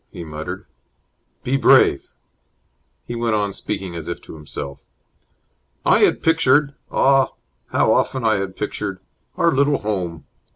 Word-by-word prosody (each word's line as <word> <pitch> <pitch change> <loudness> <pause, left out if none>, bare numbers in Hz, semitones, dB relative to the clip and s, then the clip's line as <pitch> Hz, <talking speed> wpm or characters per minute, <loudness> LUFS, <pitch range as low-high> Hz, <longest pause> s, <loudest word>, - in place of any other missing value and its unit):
he 85 - -8
muttered. 80 +4 -6 0.8
"Be 135 +2 +1
brave!" 130 - +4 1.0
He - - -6
went 115 -2 0
on, 100 -2 -1
speaking 95 -2 -5
as 85 -1 -6
if 85 - -4
to - - -11
himself. 70 -2 -7 1.0
"I - - +5
had - - +3
pictured 145 -3 +3 0.2
ah, 135 0 +3 0.3
how - - +2
often 130 -2 0
I 110 -1 +3
had 95 -1 -4
pictured! 95 -2 -4 0.4
our 170 -2 +3
little 140 0 +2
home! 90 -6 -4
105 Hz, 135 wpm, -21 LUFS, 85-135 Hz, 1.0 s, I